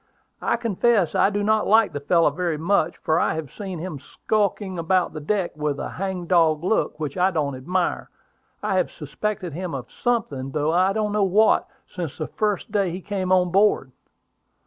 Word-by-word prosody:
I - - +1
confess 225 -4 +2
that - - +1
I - - +5
do 205 0 -1
not 215 +1 +2
like 220 +1 +4
the 145 - -3
fellow 165 +2 +3
very 170 0 -2
much, 170 0 +1
for 155 - +1
I - - +1
have 160 -4 -6
seen 190 -3 -6
him 165 -3 -5
skulking 200 +2 -2
about 180 +2 +1
the 155 - -5
deck 180 +3 -1
with 150 -2 -2
a - - -4
hang 190 -2 -4
dog 165 -3 +3
look 185 -5 0
which 150 +2 -4
I 185 +1 +4
don't 150 -6 -1
admire. 175 +8 -2 0.5
I 200 -2 +1
have 180 - +1
suspected 180 +4 -4
him 175 -1 -4
of 130 - -7
something, 170 - -1
though 150 +1 +1
I 185 +2 +3
don't 210 0 -1
know 210 0 +1
what, 205 +3 +3 0.2
since - - -6
the - - -3
first 210 -2 -2
day 200 -3 +1
he 175 +2 -5
came 190 -1 -3
on 180 -1 +3
board. 195 -9 +3
185 Hz, 195 wpm, -23 LUFS, 155-205 Hz, 0.5 s, I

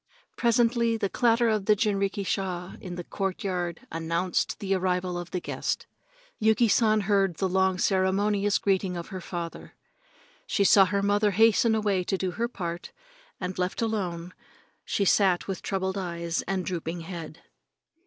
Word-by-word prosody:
Presently 235 -1 +2
the 200 -3 -1
clatter 235 +1 +3
of 215 -3 +1
the 210 - +5
jinrikisha 195 -3 -1
in 180 -2 -6
the 175 - -5
courtyard 185 -1 -3
announced 165 +2 -1
the 195 -1 -1
arrival 180 -1 0
of 175 -1 -5
the 180 - -2
guest. - - -3 0.5
Yuki 220 +2 +4
San 215 0 +3
heard 195 -3 +2
the 190 - 0
long 190 0 +2
ceremonious 200 +2 +2
greeting 190 -2 0
of 170 - -7
her 185 -1 -6
father. 170 -1 -6 0.7
She 200 - +1
saw 195 0 +7
her 200 +2 -1
mother 205 +1 +3
hasten 220 +2 +4
away 205 -4 +1
to 190 - 0
do 185 -1 -2
her 230 +6 -1
part 175 -7 -6 0.5
and, 185 -1 -4
left 180 0 -1
alone, 180 -6 -2 0.5
she 200 - 0
sat 190 -2 +3
with 190 -2 -4
troubled 190 0 -2
eyes 170 -2 -3
and 190 -1 -1
drooping 170 -1 -4
head. 165 -2 -8
190 Hz, 155 wpm, -27 LUFS, 180-210 Hz, 0.7 s, saw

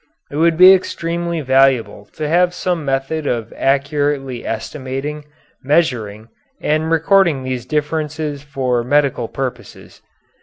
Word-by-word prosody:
It 145 - -5
would 165 0 +3
be 185 +2 +9
extremely 170 -2 -2
valuable 130 -6 +2
to 155 - -3
have 175 +3 +2
some 175 -3 -2
method 140 +3 -2
of 115 -2 -2
accurately 140 -2 0
estimating, 135 +5 -5 0.4
measuring, 120 -8 0 0.3
and 155 +1 0
recording 165 -3 +3
these 130 -2 -4
differences 150 -1 -2
for 130 -4 -1
medical 135 -2 +1
purposes. 130 0 -7
145 Hz, 115 wpm, -18 LUFS, 130-160 Hz, 0.4 s, be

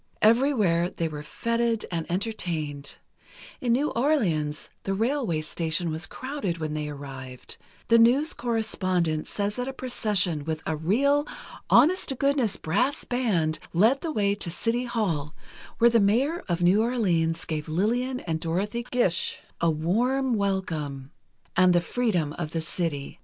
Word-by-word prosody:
Everywhere 215 -8 +3
they 165 -3 -2
were 150 -2 -6
fêted 230 +7 -1
and 165 -2 -3
entertained; 170 -8 -3 0.6
in 245 - 0
New 285 +5 +1
Orleans 175 - 0
the 195 - -2
railway 225 - 0
station 160 +2 -2
was 160 +1 -4
crowded 255 -10 -4
when 155 -2 -3
they 150 -1 -3
arrived; 135 -3 -8 0.3
the 230 0 +6
news 260 +7 +4
correspondent 185 -9 -1
says 205 +1 -2
that 250 +1 -2
a 270 - -4
procession 205 - 0
with 160 +1 -3
a 160 - -1
"real, 280 - +2 0.4
honest 370 +5 +5
to 270 - -1
goodness 270 -6 +1
brass 250 - 0
band 195 -11 0
led 225 +10 +4
the 330 - -2
way 205 -6 +1
to 200 -3 -4
the 165 - -4
City 240 +2 0
Hall, 170 -11 -2 0.4
where 235 +1 +5
the 230 - +5
Mayor 255 - +2
of 175 0 0
New 185 +5 +5
Orleans 175 -9 +1
gave 155 -1 -4
Lillian 245 +10 0
and 160 -2 -2
Dorothy 195 +8 -2
Gish 215 -9 +1 0.2
a 170 - +4
warm 240 - +1
welcome 160 -10 -2 0.4
and 185 0 +5
the 175 - +5
freedom 175 -7 0
of 155 -2 -4
the 165 - -1
city." 160 -4 -3
195 Hz, 150 wpm, -26 LUFS, 160-240 Hz, 0.6 s, the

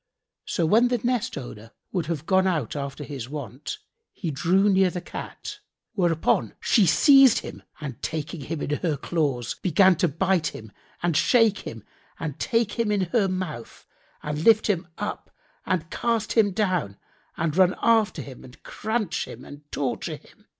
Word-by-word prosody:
So 170 - 0
when 225 +9 +5
the 245 0 +1
nest 240 -4 -1
owner 115 -4 -9 0.2
would 175 -5 -2
have 160 -2 -3
gone 190 +1 +3
out 155 - -1
after 140 0 -5
his 135 -4 -7
wont, 140 - -6 0.3
he 170 -5 -4
drew 180 +8 +2
near 190 -2 +4
the 180 - -4
Cat; - - -8 0.3
whereupon 165 - +1
she 205 -5 +3
seized 270 - +6
him - - -9 0.2
and 140 -5 -7
taking 155 0 -4
him 150 +2 -4
in - - -3
her 160 -5 -1
claws, 140 -5 -1
began 190 +1 +5
to 175 - +2
bite 170 +2 +1
him 110 -1 -10 0.3
and 175 -2 +1
shake 225 - +4
him 115 -3 -8 0.4
and 155 -4 -5
take 230 -1 0
him 225 -2 +1
in 205 -2 +1
her 220 -5 +3
mouth 185 -10 -5 0.4
and 150 +1 -3
lift 220 +1 +5
him 185 -4 0
up 210 +1 -5 0.4
and 170 -2 -1
cast 230 -2 -1
him 220 -3 +4
down 180 - -1 0.4
and 160 -2 -1
run 185 0 +4
after 220 -9 +2
him 130 -2 -11
and 125 0 -15
cranch 220 -4 -2
him - - -10
and 145 +1 -13
torture 135 -4 -2
him. - - -20
175 Hz, 170 wpm, -25 LUFS, 145-205 Hz, 0.4 s, seized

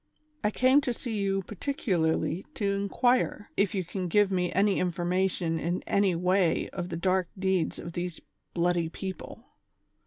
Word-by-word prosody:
I 210 - +3
came 255 +6 +4
to 250 -3 -1
see 230 -2 -4
you 195 -1 0
particularly 180 - -1
to 200 -2 0
inquire, 205 +2 +1
if 200 0 +1
you 190 - 0
can 180 +1 -3
give 205 +3 +3
me 180 -2 0
any 200 +1 +2
information 180 -1 0
in 175 +3 -2
any 200 -3 +2
way 180 0 +2
of 175 -1 -4
the 165 - -3
dark 185 0 +1
deeds 190 -3 0
of 170 - -7
these 175 -1 -4 0.4
bloody 170 -1 +1
people 190 +5 -7
185 Hz, 155 wpm, -28 LUFS, 175-200 Hz, 0.4 s, came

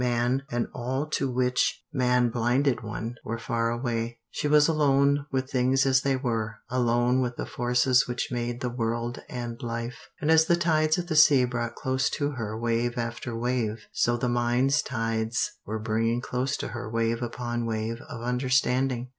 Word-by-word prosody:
Man, 120 +2 +1
and 120 0 0
all 130 +4 -2
to 135 - 0
which 125 0 +1
man 125 -1 +3
blinded 120 +2 +1
one, 110 +2 -5
were 115 - -3
far 115 0 -1
away. 120 -1 -2
She - - -2
was 150 0 +5
alone 140 -2 +3
with 130 0 -2
things 130 +1 +2
as 130 -1 +4
they 135 0 +1
were, 115 -4 -2 0.2
alone 125 0 +2
with 125 -1 -2
the - - -4
forces 125 +1 +2
which 120 0 -2
made 120 0 -3
the 125 - -2
world 120 0 -2
and 120 0 -5
life, 115 0 -5
and 155 +1 +1
as 160 0 +6
the 170 - +4
tides 155 -2 +2
of 180 - -2
the 165 -3 -3
sea 145 -4 +7
brought 120 -1 -3
close 130 0 0
to 145 0 0
her 110 -5 -4
wave 120 +1 0
after 115 0 -4
wave, 115 -2 -1
so 120 0 +2
the 125 - -1
mind's 120 +4 +2
tides 115 -2 -1 0.2
were 110 +2 -2
bringing 115 +2 0
close 130 +2 -2
to - - -4
her 120 -2 -6
wave 115 +1 0
upon 120 0 -3
wave 115 +1 -3
of 120 -1 -7
understanding. 125 0 +1
120 Hz, 180 wpm, -27 LUFS, 115-130 Hz, 0.2 s, sea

